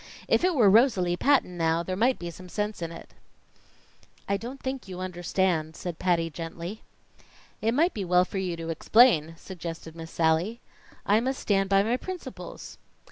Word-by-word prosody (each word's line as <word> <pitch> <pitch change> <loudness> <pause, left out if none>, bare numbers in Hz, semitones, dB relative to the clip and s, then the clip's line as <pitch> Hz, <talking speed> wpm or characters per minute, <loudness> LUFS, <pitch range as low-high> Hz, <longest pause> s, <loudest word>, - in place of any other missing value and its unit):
If - - +2
it 365 -2 +2
were 235 -7 +5
Rosalie 195 -5 +4
Patton 250 -6 +2
now, 165 +1 +1
there 185 +2 -3
might 245 +6 +2
be 175 -1 -6
some 180 +2 -12
sense 210 0 -3
in 165 -1 -3
it." 165 - -11 1.1
"I 200 - +1
don't 240 +7 -6
think 260 -4 -5
you 185 -1 -7
understand," 175 -3 -1
said 175 -3 -6
Patty 175 -2 +1
gently. 170 +5 -7 0.8
"It 225 +1 +1
might 335 +6 +3
be 205 - -3
well 180 0 +3
for 195 - -4
you 180 -3 -2
to 165 0 -6
explain," 165 -3 +4
suggested 165 -3 -8
Miss 165 0 -8
Sallie. 165 +9 +1 0.5
"I 205 +2 +4
must 260 +3 -2
stand 195 -2 +1
by 195 0 +4
my 235 +4 +1
principles." 370 +5 -8
185 Hz, 175 wpm, -27 LUFS, 170-225 Hz, 1.1 s, were